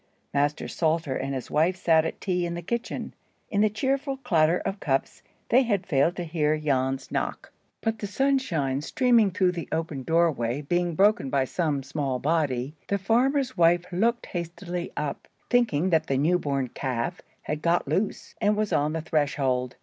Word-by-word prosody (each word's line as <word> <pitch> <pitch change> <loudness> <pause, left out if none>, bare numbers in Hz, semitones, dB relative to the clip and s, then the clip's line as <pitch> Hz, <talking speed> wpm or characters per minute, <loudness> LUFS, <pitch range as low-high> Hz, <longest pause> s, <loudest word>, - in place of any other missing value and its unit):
Master 145 +1 0
Salter 160 -4 0
and 135 0 -2
his 130 - -6
wife 165 +5 +2
sat 165 -3 +3
at - - -4
tea 180 -2 -1
in 170 - -4
the 170 - -6
kitchen. 235 +6 -4 0.4
In 205 - +2
the 215 - +4
cheerful 270 +5 -1
clatter 175 -10 +2
of 195 +2 -4
cups, 135 -5 -1 0.3
they 250 +3 +6
had 205 -7 0
failed 160 +1 +2
to 175 - -3
hear 155 -2 0
Jan's 135 -3 -1
knock; - - -3 0.3
but 225 -1 -1
the 205 - -3
sunshine 195 - 0
streaming 235 - +3
through 185 -1 +2
the 170 -3 -6
open 160 -4 -2
doorway 145 -5 +1
being 175 +2 0
broken 200 -6 +3
by 135 -1 +1
some 150 -2 -1
small 140 -2 -2
body, 140 -3 0
the 200 - +1
farmer's 250 +6 +1
wife 175 +1 +4
looked 230 +7 +1
hastily 175 0 -5
up, 150 -2 -3 0.2
thinking 190 -9 +2
that 160 -1 +2
the 135 - +1
new 170 +6 +3
born 140 -5 -1
calf 125 -3 -3 0.2
had 150 0 -3
got 170 +1 +1
loose, 205 +2 -2
and 210 0 +2
was 215 -1 0
on 150 +1 +1
the 160 - -2
threshold. 140 -5 0
165 Hz, 175 wpm, -26 LUFS, 145-200 Hz, 0.4 s, they